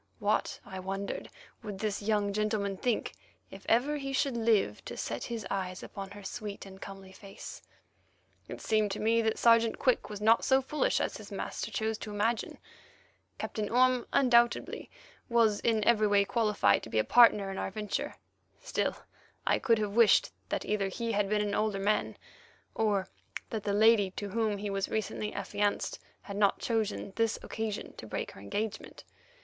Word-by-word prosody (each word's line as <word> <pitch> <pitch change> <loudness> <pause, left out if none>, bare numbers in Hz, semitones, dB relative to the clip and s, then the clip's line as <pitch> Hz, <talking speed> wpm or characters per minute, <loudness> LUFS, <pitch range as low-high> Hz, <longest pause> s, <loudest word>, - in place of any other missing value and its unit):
What, 210 -2 0
I 190 -2 -7
wondered, 195 +1 -4 0.3
would 205 -2 -6
this 210 0 -2
young 205 -1 +1
gentleman 210 -1 0
think 240 +4 -1 0.4
if - - -12
ever 270 +6 +3
he 275 -1 -4
should 270 -1 +1
live 220 - +2
to - - -7
set 115 +1 -3
his 230 -3 -5
eyes 185 -2 -3
upon 195 -1 -7
her 205 0 -11
sweet 200 +1 -6
and 190 0 -12
comely 195 -1 -9
face? 195 0 -10 0.9
It - - -8
seemed 215 -1 +2
to - - -5
me 230 +2 +3
that 220 -1 0
Sergeant 230 -1 +4
Quick 255 -6 +1
was 210 -1 -6
not 220 +2 +4
so 265 0 +4
foolish 270 +3 0
as - - -2
his - - -11
master - - -4
chose 220 -1 -2
to 215 - -6
imagine. 210 +3 -1 0.8
Captain 210 -1 -3
Orme 255 +1 +3
undoubtedly 240 -3 +3 0.4
was 230 -3 +3
in 220 -2 +1
every 215 -1 +4
way 200 -1 +4
qualified 210 - +2
to - - -9
be 110 - -2
a 110 - +4
partner 210 - +5
in 195 - -5
our - - -2
venture; 210 +1 -3 0.4
still, - - -1 0.5
I - - +3
could 230 -3 +3
have 210 -2 -2
wished 230 -3 +5 0.2
either 210 -2 0
that 190 - -5
he 230 -1 -2
had 205 -2 +1
been 210 0 +2
an 205 - -2
older 215 -1 0
man, 205 +2 0 0.6
or 205 -4 +1 0.4
that 220 - -2
the 205 - +1
lady 215 -1 +5
to 205 - -4
whom 215 0 0
he 205 0 -4
was 195 0 -1
recently 215 -1 -2
affianced 205 +1 -1 0.2
had 200 -1 -6
not 200 -1 +3
chosen 215 -3 -2
this 225 -1 +1
occasion 220 -2 -4
to 110 - -8
break - - -4
her - - -13
engagement. 205 - -4
210 Hz, 175 wpm, -30 LUFS, 200-230 Hz, 0.9 s, partner